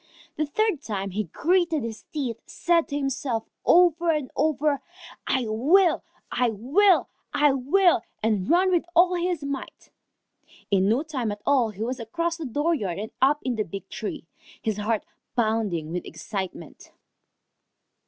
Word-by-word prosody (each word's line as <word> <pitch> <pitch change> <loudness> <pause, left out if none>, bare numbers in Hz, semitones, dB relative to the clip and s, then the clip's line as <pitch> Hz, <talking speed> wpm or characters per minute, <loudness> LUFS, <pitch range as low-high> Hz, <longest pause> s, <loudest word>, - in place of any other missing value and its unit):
The 305 0 -1
third 425 0 0
time 195 -3 -4
he 210 +3 -2
gritted 330 - +1
his 225 -1 -6
teeth, 255 -7 -3
said 340 -1 +1
to 285 - -3
himself 270 -4 -2 0.2
over 345 -1 +4
and 300 -5 0
over, 300 -2 +1 0.5
"I 260 -2 +1
will! 310 - +3 0.3
I 245 -1 +2
will! 295 - +3 0.3
I 295 -1 +5
will!" 300 - +3 0.2
and 210 -4 +1
ran 370 +3 +4
with 350 -2 +3
all 355 +1 +6
his 350 -3 -1
might. 280 -1 -6 0.8
In 195 0 +3
no 245 +7 +2
time 260 -8 -3
at 205 0 -7
all 260 -5 +3
he 210 +1 -5
was 255 +2 -3
across 335 +9 -2
the 325 - -5
dooryard 280 - 0
and 215 +2 -5
up 285 +3 +4
in 250 -3 -1
the 215 - +1
big 195 0 -8
tree, 215 -5 -5 0.4
his 215 -2 -1
heart 210 +1 -1 0.3
pounding 215 -9 0
with 180 +1 -3
excitement. 180 -1 -6
260 Hz, 155 wpm, -25 LUFS, 215-330 Hz, 0.8 s, all